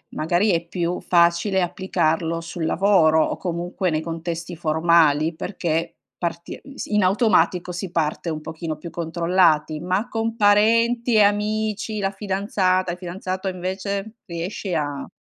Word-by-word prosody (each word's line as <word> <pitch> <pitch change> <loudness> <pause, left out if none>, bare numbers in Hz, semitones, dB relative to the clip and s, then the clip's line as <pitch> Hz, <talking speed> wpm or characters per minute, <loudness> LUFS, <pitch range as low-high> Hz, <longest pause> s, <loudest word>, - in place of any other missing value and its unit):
magari 175 +7 +1
è 170 -1 0
più 175 0 -2
facile 175 +3 +2
applicarlo 165 -2 -1
sul 165 0 -5
lavoro 160 -4 +4
o - - -2
comunque 175 +1 -2
nei 155 0 0
contesti 165 +1 -5
formali 160 -1 +3
perché 165 -2 -2 0.2
parti 170 -1 -4
ehm, 275 - -14
si 215 - -4
in 210 - +4
automatico 185 -3 +2
si 175 +1 -5
parte 165 0 -1
un 155 -1 -4
pochino 160 0 -5
più 170 +3 -8
controllati, 165 -2 +1
ma 185 +6 -1
con 225 0 -2
parenti 230 +3 +3
e 215 - +6
amici, 210 +1 0
la 195 -1 0
fidanzata, 190 -2 0
il - - -8
fidanzato 185 +1 -5
invece? 195 +3 -4
Riesci 180 +2 -5
a 145 -3 -2
180 Hz, 140 wpm, -22 LUFS, 165-200 Hz, 0.2 s, e